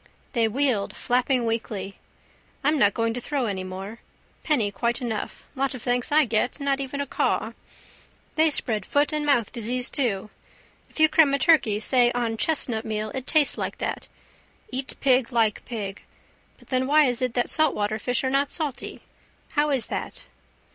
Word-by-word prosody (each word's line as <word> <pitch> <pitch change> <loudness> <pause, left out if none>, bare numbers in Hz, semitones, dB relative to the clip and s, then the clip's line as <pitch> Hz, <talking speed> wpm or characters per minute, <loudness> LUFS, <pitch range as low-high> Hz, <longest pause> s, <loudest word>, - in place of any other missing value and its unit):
They 230 -3 +2
wheeled 240 -3 0
flapping 250 0 +1
weakly. 210 -4 -3 0.6
I'm 300 +1 +2
not 205 -3 +4
going 230 0 0
to 245 - -5
throw 280 -1 -2
any 195 -4 -3
more. 190 +4 -7 0.4
Penny 240 -10 +1
quite 235 +4 -1
enough. 235 -4 -4
Lot 275 -1 -1
of 245 - -9
thanks 245 +1 -1
I 305 0 +5
get. 235 +4 0
Not 280 -1 0
even 275 +1 -4
a - - -2
caw. - - -1 0.8
They 315 0 +4
spread 220 -8 +1
foot 290 +8 +1
and 300 -1 -1
mouth 240 -7 +2
disease 245 +2 -2
too. 215 -6 -1 0.6
If - - -11
you 315 - +7
cram 305 -2 +4
a - - +1
turkey 270 -10 +3
say 240 +2 +3
on 235 -2 -1
chestnutmeal 220 -7 -1
it 265 0 -5
tastes 305 -3 +4
like - - -3
that. - - -4 0.6
Eat 260 +1 -2
pig 255 -2 +3
like 225 -3 +1
pig. 205 -5 -5 0.6
But - - -21
then 260 0 0
why 300 +1 +5
is 245 -2 +1
it 250 -2 -1
that 245 - 0
saltwater 215 -9 +1
fish 245 +3 -1
are 260 - 0
not 275 +1 +2
salty? 290 -6 -3 0.5
How 300 -1 +1
is 270 -5 +1
that? - - -6
245 Hz, 175 wpm, -25 LUFS, 225-280 Hz, 0.8 s, you